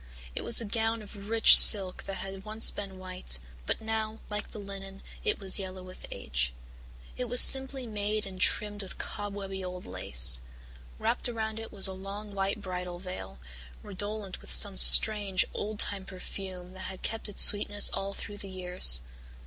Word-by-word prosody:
It - - -5
was 235 - +4
a 230 - -4
gown 225 +1 -4
of 200 0 -14
rich 225 0 +6
silk 195 -4 +6
that 195 - -7
had 195 0 -9
once 215 +1 0
been 195 -2 -9
white, 185 - -4 0.3
but - - -1
now, 220 0 -5
like 210 0 -6
the - - -13
linen, 195 -1 -11 0.2
it 425 - -1
was 195 0 -2
yellow 185 -1 -9
with 185 0 -13
age. - - -5 0.6
It 250 - -4
was 245 +1 +3
simply 265 -1 +3
made 210 -1 -4
and 190 -1 -11
trimmed 205 -1 +2
with 195 - -9
cobwebby 200 -2 -7
old 180 0 -9
lace. 60 +1 +1 0.6
Wrapped 235 +2 -4
around 220 -2 -6
it 225 - -11
was 195 -2 +1
a 190 - -1
long 200 +2 -10
white 195 +1 -4
bridal 180 -2 -8
veil, 180 - -10 0.5
redolent 205 -1 -8
with - - -13
some 200 -2 +5
strange, 205 -2 +7
old 210 +1 -6
time 200 -2 0
perfume 185 -1 -11
that 190 0 -10
had 190 - -12
kept 225 -1 -5
its 205 - +6
sweetness 205 0 +5
all 195 0 -7
through 205 - -10
the 200 - -10
years. 180 - +3
200 Hz, 175 wpm, -27 LUFS, 185-215 Hz, 0.6 s, strange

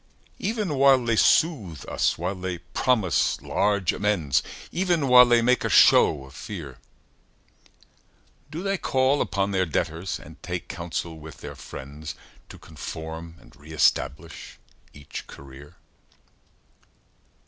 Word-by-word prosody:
Even 210 - -2
while 135 -2 +5
they 115 -1 +2
soothe 105 - +2
us, - - 0
while 90 +3 -2
they 90 -2 -4
promise 95 +2 0
large 100 -3 +1
amends, 85 -11 +1 0.3
Even 175 -5 +1
while 125 -1 +8
they 120 -1 +4
make 125 +2 +2
a - - -1
show 70 -4 +5
of 65 - -15
fear, 75 - -8 1.7
Do 160 +4 -6
they 195 -1 -1
call 130 +2 +2
upon 100 0 -1
their 95 -2 +1
debtors, 85 +3 -2
and 80 +1 -14
take 90 -1 -5
counsel 85 -1 -5
with 75 -2 -12
their - - -7
friends, 70 +3 -9 0.3
To - - -11
conform 80 +1 -8
and - - -19
re 75 +2 -13
establish 80 - 0 0.3
each 70 -1 -9
career? 70 +1 -13
90 Hz, 125 wpm, -25 LUFS, 80-125 Hz, 1.7 s, while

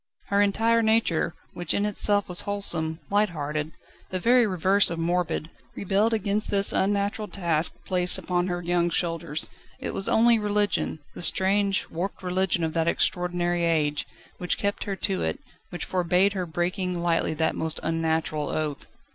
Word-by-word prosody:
Her 200 0 +3
entire 225 +3 +2
nature, 220 -8 +1 0.2
which 175 -1 -2
in 200 - +1
itself 205 0 +2
was 180 -1 0
wholesome, 170 -6 -1
light 210 +1 +3
hearted, 150 -1 -4 0.4
the 185 - -2
very 240 +3 +4
reverse 190 +1 +3
of 170 - -4
morbid, 170 -1 -1 0.2
rebelled 200 +3 +1
against 210 -1 -1
this 200 -1 +1
unnatural 200 +2 0
task 170 -5 +3
placed 180 -1 +2
upon 180 0 -1
her 175 -1 -3
young 175 0 +1
shoulders. 165 -2 -1 0.3
It - - -4
was 195 - 0
only 230 0 +4
religion 205 -6 0
the - - -7
strange, 195 +2 +3
warped 185 +3 -4
religion 180 -1 0
of 160 -1 -1
that 165 -1 0
extraordinary 175 0 0
age 155 -3 0 0.3
which 180 -1 -1
kept 200 0 -2
her 200 - -3
to 190 0 -2
it, - - -2 0.3
which 175 - -5
forbade 180 +2 +2
her 185 -3 -3
breaking 180 +2 -2
lightly 170 -2 0
that 160 +1 +1
most 160 0 -2
unnatural 160 -2 -1
oath. 150 -2 -3
180 Hz, 160 wpm, -25 LUFS, 165-200 Hz, 0.4 s, very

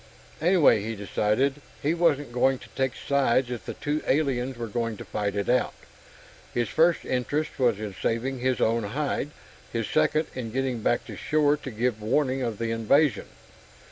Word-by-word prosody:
Anyway, 170 - +5
he 110 +2 -4
decided, 110 +7 0 0.2
he 150 +3 +1
wasn't 150 -6 +1
going 130 +2 +2
to - - -14
take 130 -1 -1
sides 130 -2 +1
if 120 - -6
the - - -4
two 150 +1 -2
aliens 130 -3 +1
were 120 - -3
going 115 0 -2
to - - -8
fight 105 -1 -2
it 100 -1 -1
out. 125 0 +2 0.8
His 120 -1 0
first 165 +1 +3
interest 140 +5 -2
was 120 -5 +3
in 105 -2 -5
saving 125 +7 -2
his 130 0 0
own 115 +1 +2
hide; 135 +6 -2 0.4
his 115 -2 -2
second, 155 0 +2
in 125 -3 -4
getting 130 -1 -1
back - - +1
to - - -8
shore 150 -1 +2
to 140 - -7
give 115 -1 -1
warning 130 +4 +1
of 115 -4 -2
the 115 +1 -2
invasion. 115 +2 +2
125 Hz, 175 wpm, -26 LUFS, 115-145 Hz, 0.8 s, Anyway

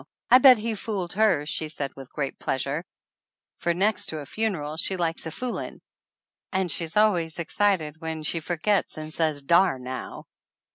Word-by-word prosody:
I 255 - +10
bet 260 -2 +9
he 225 +1 -2
fooled 200 -4 -3
her!" 205 -7 +3
she 155 +1 -3
said 145 -3 -4
with 135 -1 -11
great 140 -3 -3
pleasure, 140 +4 -2 0.8
for 175 - +1
next 200 +5 +1
to 160 - -4
a 145 - -6
funeral 165 -6 -2
she 185 +4 -2
likes 165 -1 -1
a - - -5
fooling, 250 +8 -4 0.7
and 190 -3 0
she 170 - -1
is 160 +5 -6
always 180 -7 +3
excited 170 -3 0
when 160 -1 -4
she 165 +2 -1
forgets 175 +5 0
and 155 0 -7
says 155 -4 0
"Dar 170 0 +4
now." 130 0 -7
165 Hz, 175 wpm, -26 LUFS, 155-200 Hz, 0.8 s, I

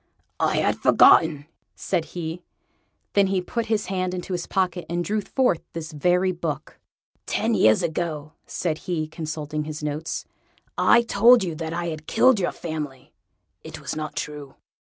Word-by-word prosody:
"I - - +1
had - - +1
forgotten," 150 -3 +5 0.3
said 175 -4 -1
he. 165 +1 -4 0.7
Then 200 -1 +4
he 190 0 +1
put 225 +5 -3
his 215 -2 0
hand 185 -1 -2
into 185 +1 -5
his 175 -1 -3
pocket, 180 -2 -1
and 175 0 -1
drew 215 +1 0
forth 250 -5 +1
this 165 -1 -6
very 180 +5 +2
book. 165 -5 -5 0.5
"Ten - - 0
years 110 +7 +4
ago," 160 -2 -3
said 160 -3 -2
he, 160 -3 -1
consulting 155 -2 -4
his 150 0 -6
notes, 150 +2 -3 0.5
"I 235 - +5
told 235 0 +5
you 175 -3 -2
that 160 0 -5
I 170 0 -2
had 155 -1 -7
killed 255 -4 +4
your 175 - 0
family. 150 -5 -6 0.5
It - - -8
was - - -5
not 155 -1 -5
true." 145 -2 -6
170 Hz, 160 wpm, -24 LUFS, 155-185 Hz, 0.7 s, forgotten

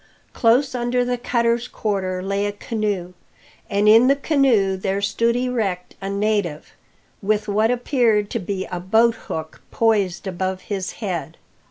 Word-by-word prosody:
Close 255 +4 +3
under 245 0 0
the 245 0 0
cutter's 235 0 0
quarter 190 -6 -2
lay 200 +1 -1
a - - -2
canoe, 205 -4 -3 0.6
and 205 +1 +1
in 225 +4 +7
the 275 - +5
canoe 265 -10 +2
there 190 +1 -2
stood 230 +4 +1
erect 225 -8 -2
a 195 - -4
native, 200 -6 -1 0.5
with 210 +1 0
what 215 +2 +2
appeared 240 -4 +2
to 230 - -1
be 190 0 -3
a 180 - -3
boathook 190 -5 0
poised 205 -6 +1
above 185 0 -3
his 195 -2 -4
head. 175 -6 -4
210 Hz, 145 wpm, -21 LUFS, 190-235 Hz, 0.6 s, in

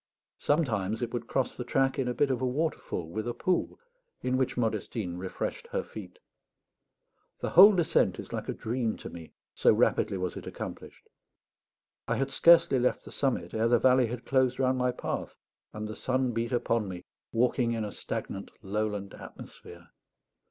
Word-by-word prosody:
Sometimes 115 - 0
it 120 - -4
would 120 -1 -3
cross 135 - -1
the 125 - -4
track 135 +2 +1
in 130 - 0
a 125 - 0
bit 140 -2 +2
of 130 - -1
waterfall, 130 - -2
with 110 +7 -4
a 120 - -3
pool, 180 +8 -1 0.4
in 125 0 +1
which 130 -1 0
Modestine 110 -5 -2
refreshed 280 - -4
her 485 0 -2
feet. - - -10 1.2
The - - -3
whole 200 +3 +9
descent 170 -3 +2
is - - -8
like - - -4
a - - 0
dream 115 -1 -2
to - - -9
me, 85 -2 -10 0.2
so - - +4
rapidly 95 - +2
was 90 -1 -3
it - - -8
accomplished. - - -8 1.0
I - - +1
had 135 0 -1
scarcely 165 -3 +6
left 125 - 0
the - - -10
summit 120 -11 -1
ere 110 +1 +2
the 120 +1 +5
valley 125 +1 +4
had 120 +1 -6
closed 130 -2 +2
round 130 -1 +1
my 125 0 +2
path, 125 - -4 0.4
and 105 0 -5
the 110 - -6
sun 130 -1 0
beat 115 +1 -2
upon 115 -3 0
me, 90 -1 -7 0.3
walking 120 0 +2
in 110 -2 -2
a 105 - -5
stagnant - - -5
lowland 105 0 -2
atmosphere. - - -12
120 Hz, 175 wpm, -29 LUFS, 110-130 Hz, 1.2 s, whole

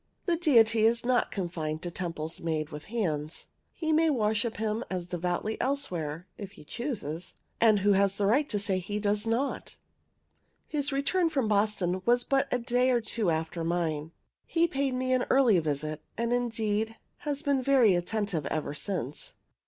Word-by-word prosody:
The 345 - +2
Deity 230 -9 +5
is 230 +1 +3
not 250 0 +2
confined 165 -4 -3
to 175 - -3
temples 165 -2 -4
made 155 -2 -2
with 150 0 -8
hands. 160 -9 -3 0.2
He 315 -1 -1
may 320 +1 +4
worship 220 -3 0
him 220 +2 -1
as 180 -2 -3
devoutly 180 +4 -2
elsewhere, 180 - -2
if 200 -2 -7
he 200 - -13
chooses; 180 - -4 0.2
and 215 -3 +5
who 205 +1 +4
has 195 0 +2
a 200 - +2
right 275 +8 +3
to 210 - 0
say 195 -2 0
he 205 +3 -4
does 210 +1 0
not? 240 +5 -2 0.9
His 290 -2 0
return 305 +6 +1
from 270 -7 0
Boston 200 -3 +1
was 240 +3 +3
but 275 +1 +1
a - - +2
day 245 +1 +1
or 245 -2 +3
two 220 -3 -1
after 165 +1 -2
mine. 165 -2 -1 0.4
He 335 0 +3
paid 275 -4 -1
me 255 0 0
an 255 -1 +2
early 250 -8 +5
visit, 155 0 -2 0.2
and, 235 +1 0
indeed, 225 -2 -1 0.2
has 290 -1 -3
been 280 -2 +2
very 255 -6 +5
attentive 175 -3 -1
ever 150 -2 -2
since. 150 - -4
210 Hz, 170 wpm, -29 LUFS, 175-250 Hz, 0.9 s, Deity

